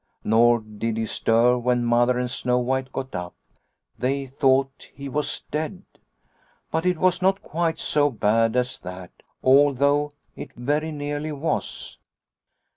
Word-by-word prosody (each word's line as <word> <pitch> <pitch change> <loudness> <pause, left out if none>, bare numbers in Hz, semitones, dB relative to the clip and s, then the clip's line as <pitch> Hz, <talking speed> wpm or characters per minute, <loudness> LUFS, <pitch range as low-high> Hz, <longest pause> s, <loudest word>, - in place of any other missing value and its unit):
Nor 120 +1 +4
did 110 +1 -4
he 115 - -1
stir 115 +3 +2
when 120 0 +1
Mother 120 +1 +3
and 125 -1 -2
Snow 125 -1 0
White 130 +1 -1
got 130 0 -5
up. 90 -1 -5 0.6
They 135 +3 -1
thought 135 0 +1
he 140 0 -7
was 145 +2 -3
dead. 160 +5 -3 0.4
" - - -39
But 160 +3 0
it 180 -2 +2
was 185 +2 +2
not 190 +1 +2
quite 165 0 -1
so 145 -1 +1
bad 115 -1 +1
as 125 +1 0
that, 90 0 -9 0.3
although 140 +2 +4 0.2
it - - -9
very 150 +6 -1
nearly 145 +1 -4
was." 150 +2 -3
130 Hz, 145 wpm, -24 LUFS, 120-145 Hz, 0.6 s, Nor